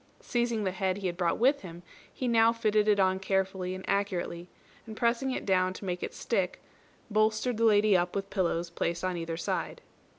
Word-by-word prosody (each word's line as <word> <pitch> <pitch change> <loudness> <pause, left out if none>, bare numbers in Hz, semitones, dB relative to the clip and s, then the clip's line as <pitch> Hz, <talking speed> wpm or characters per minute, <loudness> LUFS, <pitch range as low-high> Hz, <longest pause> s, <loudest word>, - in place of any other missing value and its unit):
Seizing 235 -3 -1
the 190 - 0
head 190 0 -1
he 200 - -6
had 175 -2 -1
brought 175 -1 0
with 270 +4 +3
him, 175 -1 -10 0.3
he 255 - -4
now 230 -1 +5
fitted 215 -2 +1
it 205 -1 +4
on 190 0 +3
carefully 190 -1 -1
and 185 - -8
accurately, 180 -3 -2 0.4
and 220 -1 -8
pressing 240 +3 +1
it 260 - -3
down 185 -1 +2
to 195 - -9
make 180 -1 -3
it - - -5
stick, - - -1 0.5
bolstered 215 +3 +1
the 230 - +2
lady 210 -2 +5
up 175 0 +1
with 195 0 -3
pillows 175 -3 -1
placed 170 0 -2
on 185 -1 -1
either 165 -1 -4
side. - - -3
195 Hz, 200 wpm, -29 LUFS, 180-220 Hz, 0.5 s, now